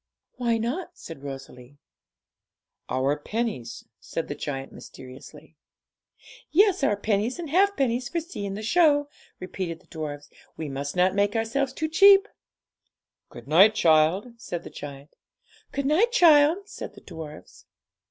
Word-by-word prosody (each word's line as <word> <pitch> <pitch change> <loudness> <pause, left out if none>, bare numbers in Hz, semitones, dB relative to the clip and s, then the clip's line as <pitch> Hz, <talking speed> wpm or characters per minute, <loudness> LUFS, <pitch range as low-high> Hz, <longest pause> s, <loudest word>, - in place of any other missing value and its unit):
'Why 235 -2 +1
not?' 310 +11 -4
said 165 -4 -10
Rosalie. 135 -1 -10 1.1
'Our 135 +3 0
pennies,' 175 - -4
said 165 - -5
the - - -2
giant 135 -2 -5
mysteriously. 130 +1 -13 0.9
'Yes, 385 -2 +3
our 205 -7 +2
pennies 210 +3 -1
and 330 -5 -6
halfpennies 275 -10 +1
for 340 - -1
seeing 205 - -6
the 215 - -6
show,' 290 +2 +3 0.3
repeated 185 -2 -5
the 185 - -26
dwarfs; 150 -3 -7 0.3
'we 155 -2 -5
must 140 +2 -5
not 180 +1 +3
make 205 +1 +1
ourselves 240 +4 0
too 310 +4 -3
cheap.' 395 +5 +6 1.0
'Good 120 +1 -12
night, 195 +8 +6
child,' 165 +7 +3
said 175 -7 -6
the - - -10
giant. 140 0 -10 0.6
'Good 280 -1 -3
night, 360 +12 +3
child,' 335 -2 +5
said - - -8
the - - -14
dwarfs. 155 -2 -11
210 Hz, 135 wpm, -25 LUFS, -, 1.1 s, cheap